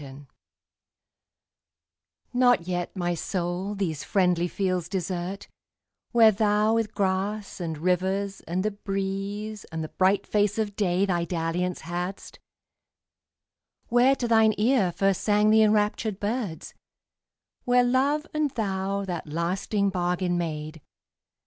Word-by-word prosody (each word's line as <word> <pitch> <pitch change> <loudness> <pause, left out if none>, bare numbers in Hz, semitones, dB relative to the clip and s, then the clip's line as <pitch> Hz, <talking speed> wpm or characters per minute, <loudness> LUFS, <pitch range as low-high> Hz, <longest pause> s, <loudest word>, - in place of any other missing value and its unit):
XXIV 140 0 -11 2.1
NOT 245 -8 +3
yet, 175 0 -3
my 175 -2 -1
soul, 180 +3 -3
these 170 -7 -2
friendly 180 -3 +2
fields 185 -2 -2
desert, 185 +1 -4 0.6
Where 230 -2 +7
thou 210 +1 +2
with 225 -2 -1
grass, 195 +2 -1
and 160 -2 -3
rivers, 190 +4 -1
and 185 +4 -1
the 215 - +1
breeze, 200 +1 -4
And 160 0 -5
the 155 - -6
bright 190 +2 +2
face 205 0 +1
of 210 -2 -2
day, 190 -1 +1
thy 175 -3 0
dalliance 170 +1 -2
hadst; 175 +3 -5 1.5
Where 245 +3 +4
to 245 - -2
thine 220 -2 +4
ear 215 -4 +3
first 195 +1 +1
sang 210 0 +3
the 220 0 +6
enraptured 210 -1 +1
birds; 205 -5 -3 0.9
Where 245 0 +4
love 275 +5 +1
and 305 -1 +1
thou 200 -4 -2
that 175 -4 -5
lasting 190 +5 -1
bargain 180 0 0
made. 155 -2 -4
195 Hz, 125 wpm, -26 LUFS, 175-215 Hz, 2.1 s, Where